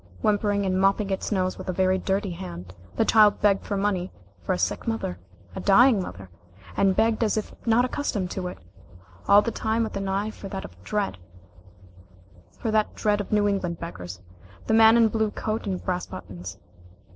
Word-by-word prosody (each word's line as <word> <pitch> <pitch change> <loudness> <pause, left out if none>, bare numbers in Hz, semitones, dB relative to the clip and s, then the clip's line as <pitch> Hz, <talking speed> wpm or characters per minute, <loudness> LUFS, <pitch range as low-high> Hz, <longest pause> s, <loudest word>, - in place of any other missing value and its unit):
Whimpering 205 -1 +1
and 185 0 +1
mopping 195 +1 +2
its 190 - -2
nose 185 -2 0
with 185 - -7
a - - 0
very 185 +1 +2
dirty 195 +1 -1
hand, 90 - -8 0.2
the 225 - +2
child 215 -2 +5
begged 200 -2 +2
money 195 -3 -1 0.3
for 85 - -3
a - - +1
sick 90 - -2
mother 225 - -2 0.4
a - - -4
dying 215 +2 +5
mother 95 - -8 0.4
and 195 -1 +3
begged 225 +1 +2
as 215 -1 +1
if 215 - -3
not 230 +2 +4
accustomed 220 -9 -2
to 185 -2 -3
it 180 - -7 0.7
all 205 +1 +7
the 230 - -2
time 225 +1 0
with 220 - -4
an 195 -1 -3
eye 200 +3 -1
for 195 - -9
that 190 0 -5 0.2
dread 205 - -2 2.0
of 205 - -9
New 210 -1 +3
England 185 -4 -1
beggars, 90 - -7 0.4
the - - 0
man 225 +1 +7
in 235 - +6
the 220 - +4
blue 220 -1 0
coat 215 +1 -3
and 185 -2 -3
brass 180 -1 -2
buttons. 90 - -8
195 Hz, 180 wpm, -25 LUFS, 185-215 Hz, 2.0 s, all